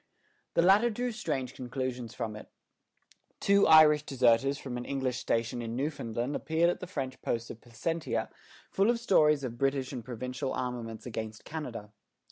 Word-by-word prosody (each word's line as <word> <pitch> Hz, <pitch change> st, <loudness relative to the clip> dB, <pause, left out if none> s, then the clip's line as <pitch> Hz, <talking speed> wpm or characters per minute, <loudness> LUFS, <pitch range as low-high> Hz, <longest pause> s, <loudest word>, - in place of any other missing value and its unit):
The 170 Hz, -, +4 dB
latter 200 Hz, +6 st, +5 dB
drew 245 Hz, +2 st, -2 dB
strange 135 Hz, -, -3 dB
conclusions 125 Hz, -2 st, -4 dB
from 110 Hz, -1 st, -4 dB
it. 105 Hz, -, -10 dB, 0.9 s
Two 200 Hz, 0 st, +4 dB
Irish 155 Hz, -2 st, +8 dB
deserters 135 Hz, 0 st, +2 dB
from 130 Hz, -3 st, -6 dB
an 120 Hz, -, -4 dB
English 130 Hz, -2 st, -2 dB
station 115 Hz, +1 st, -1 dB
in 115 Hz, 0 st, -4 dB
Newfoundland 125 Hz, -2 st, -2 dB
appeared 160 Hz, +4 st, +2 dB
at -, -, -6 dB
the 180 Hz, -, -7 dB
French 135 Hz, -7 st, -5 dB
post 115 Hz, 0 st, -2 dB
of 115 Hz, -, -11 dB
Placentia 120 Hz, -1 st, -3 dB, 0.4 s
full 195 Hz, +3 st, +3 dB
of 240 Hz, -1 st, +2 dB
stories 150 Hz, -10 st, +4 dB
of 120 Hz, -2 st, -5 dB
British 135 Hz, -1 st, 0 dB
and 125 Hz, -3 st, -5 dB
provincial 125 Hz, +3 st, -4 dB
armaments 120 Hz, -3 st, -4 dB
against 110 Hz, -2 st, -6 dB
Canada. 125 Hz, -10 st, -6 dB
130 Hz, 160 wpm, -30 LUFS, 120-155 Hz, 0.9 s, Irish